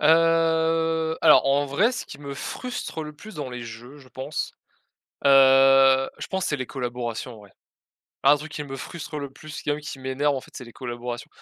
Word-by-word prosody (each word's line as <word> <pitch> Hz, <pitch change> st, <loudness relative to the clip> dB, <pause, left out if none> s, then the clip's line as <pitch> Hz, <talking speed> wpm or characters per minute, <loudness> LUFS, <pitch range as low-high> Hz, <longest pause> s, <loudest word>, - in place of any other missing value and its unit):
Heu, 165 Hz, 0 st, +3 dB
alors 155 Hz, -3 st, +6 dB
en 140 Hz, +1 st, +2 dB
vrai 165 Hz, -, +2 dB
ce -, -, -5 dB
qui -, -, -10 dB
me 140 Hz, -1 st, -7 dB
frustre 245 Hz, -, -5 dB
le 150 Hz, 0 st, -7 dB
plus 205 Hz, +8 st, -12 dB
dans 145 Hz, -4 st, -5 dB
les 125 Hz, -1 st, -6 dB
jeux 120 Hz, +5 st, -10 dB
je 135 Hz, -2 st, -17 dB
pense, 135 Hz, +3 st, -4 dB, 0.7 s
heu, 135 Hz, -1 st, +6 dB
je -, -, -5 dB
pense 190 Hz, -1 st, -2 dB
c'est 145 Hz, -, 0 dB
les 130 Hz, -2 st, -4 dB
collaborations 120 Hz, -2 st, -4 dB
en -, -, -13 dB
vrai. 100 Hz, -1 st, -17 dB, 0.7 s
Un 140 Hz, +2 st, +7 dB
truc 150 Hz, +1 st, -9 dB
qui 150 Hz, -, -4 dB
me 135 Hz, -2 st, -7 dB
frustre 155 Hz, +2 st, -7 dB
le 140 Hz, -1 st, -5 dB
plus, 155 Hz, +2 st, -10 dB
même 145 Hz, 0 st, 0 dB
qui 150 Hz, -2 st, -7 dB
m'énerve, 135 Hz, +2 st, 0 dB
en -, -, -3 dB
fait, -, -, -17 dB
c'est -, -, -7 dB
les 120 Hz, -, -12 dB
collaborations. 120 Hz, 0 st, -6 dB
140 Hz, 200 wpm, -24 LUFS, 130-155 Hz, 0.7 s, Un